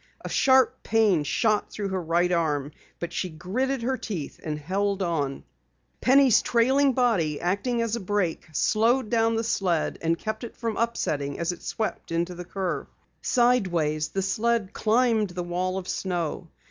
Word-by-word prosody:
A - - -3
sharp 260 -2 +3
pain 210 -8 +3
shot 215 +8 +1
through 205 -2 -4
her 190 -1 -2
right 170 +2 +1
arm, 150 -4 0 0.3
but 170 0 -5
she 180 - -2
gritted 230 +11 -2
her 260 +2 0
teeth 175 - -5
and 155 -1 -3
held 195 +5 -1
on. 145 -6 -2 0.6
Penny's 265 -2 +5
trailing 265 +4 +3
body, 200 - +1
acting 230 +7 0
as 230 0 -1
a - - -3
brake, 195 -4 -1
slowed 225 - +2
down 225 -1 +2
the 225 - 0
sled 185 -7 0
and 165 0 +1
kept 215 +4 -4
it 235 - -8
from 230 -2 -2
upsetting 145 -11 -1
as 170 +1 -1
it 175 - -9
swept 220 -5 -4
into 170 +2 -1
the 175 0 -8
curve. 185 0 -3 0.3
Sideways 175 -11 +2
it 215 +1 0
climbed 225 -2 +2
the 175 0 -4
wall 180 +2 -2
of 190 -1 -5
snow. 175 -2 -3
195 Hz, 160 wpm, -26 LUFS, 170-230 Hz, 0.6 s, Penny's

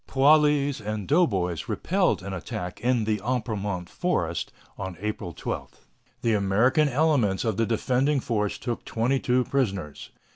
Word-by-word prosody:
Poilus 145 0 +4
and 105 -1 -4
doughboys 95 - +1
repelled - - +1
an 100 0 -5
attack 90 0 -5
in 120 -1 +2
the 105 -1 0
Apremont 105 -7 -2
Forest - - -2 0.2
on 95 -3 -6
April 105 -3 -4
12. - - -6 0.4
The 115 - +2
American 110 +9 +3
elements 130 -9 +2
of 110 -3 0
the 115 - +1
defending 130 +5 +1
force 105 -5 -1
took 120 -2 -4
twenty 125 +4 0
two 125 0 +2
prisoners. 100 - -2
115 Hz, 140 wpm, -26 LUFS, 100-130 Hz, 0.4 s, Poilus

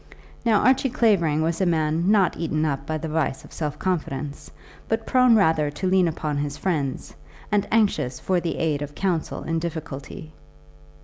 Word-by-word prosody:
Now 220 -3 +3
Archie 260 +1 +3
Clavering 170 -11 +2
was 165 +3 -1
a - - +3
man 160 +1 +1
not 200 -4 +3
eaten 155 -1 -1
up 140 -1 -2
by 155 - -1
the 160 +1 -5
vice 155 -3 -1
of - - -15
self 150 -2 -3
confidence, 150 -6 -3 0.4
but 225 0 -1
prone 255 -2 +5
rather 160 -7 +3
to 180 +6 -3
lean 185 -1 +4
upon 150 -2 -2
his 145 0 -3
friends 150 -8 -2 0.4
and 205 -1 +1
anxious 200 - +1
for 185 -1 +1
the 170 -1 -3
aid 155 -3 0
of 145 0 -6
counsel 180 -5 -2
in 165 0 -1
difficulty. 155 -2 -6
160 Hz, 175 wpm, -24 LUFS, 150-190 Hz, 0.4 s, prone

